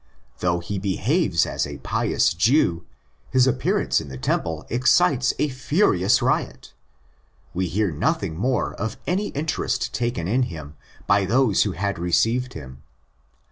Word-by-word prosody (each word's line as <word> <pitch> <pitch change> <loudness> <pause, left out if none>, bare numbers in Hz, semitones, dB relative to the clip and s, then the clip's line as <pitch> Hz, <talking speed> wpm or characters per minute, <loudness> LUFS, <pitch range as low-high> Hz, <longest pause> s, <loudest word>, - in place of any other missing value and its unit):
Though 85 -1 0
he 95 +3 -4
'behaves 100 - +1
as - - -2
& - - -23
pious - - +1
Jew, 90 - +2 0.4
his 130 -1 +4
appearance 130 - +1
in 70 - -9
the 65 - -7
Temple 80 +4 -2
excites 130 +2 +3
8 150 - 0
furious 130 - +2
riot. - - -1 0.8
We 90 +1 -1
hear 100 +2 0
nothing 80 +1 -1
more 125 +8 -1
of 110 - -4
any 195 +4 0
interest 145 -4 -2
taken 120 -8 -2
in 120 +7 +1
him 75 -3 -9 0.3
by 100 -1 +3
those 115 0 +2
who 100 - +1
had 100 0 -2
received 115 +9 +1
him. 65 -3 -10
100 Hz, 140 wpm, -23 LUFS, 85-130 Hz, 0.8 s, his